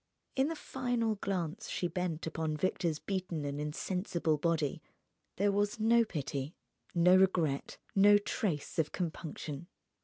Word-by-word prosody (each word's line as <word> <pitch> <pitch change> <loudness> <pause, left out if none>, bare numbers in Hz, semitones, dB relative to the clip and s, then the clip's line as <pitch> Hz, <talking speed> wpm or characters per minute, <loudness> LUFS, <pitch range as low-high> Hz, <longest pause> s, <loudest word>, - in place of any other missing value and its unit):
In 265 +1 +3
the 325 - -2
final 245 -6 -1
glance 195 -1 -3
she 175 - -1
bent 175 -2 -2
upon 160 -1 -2
Victor's 170 -2 0
beaten 180 -5 -3
and 145 +1 -3
insensible 165 +1 -1
body 160 -1 0 0.5
there 200 +1 +2
was 205 +2 0
no 230 +2 +5
pity, 145 -5 -4 0.4
no 175 +2 +6
regret, 180 -7 +2 0.2
no 205 +1 +7
trace 185 -7 -2
of 155 -2 +1
compunction. 160 -2 -4
175 Hz, 130 wpm, -33 LUFS, 155-205 Hz, 0.5 s, no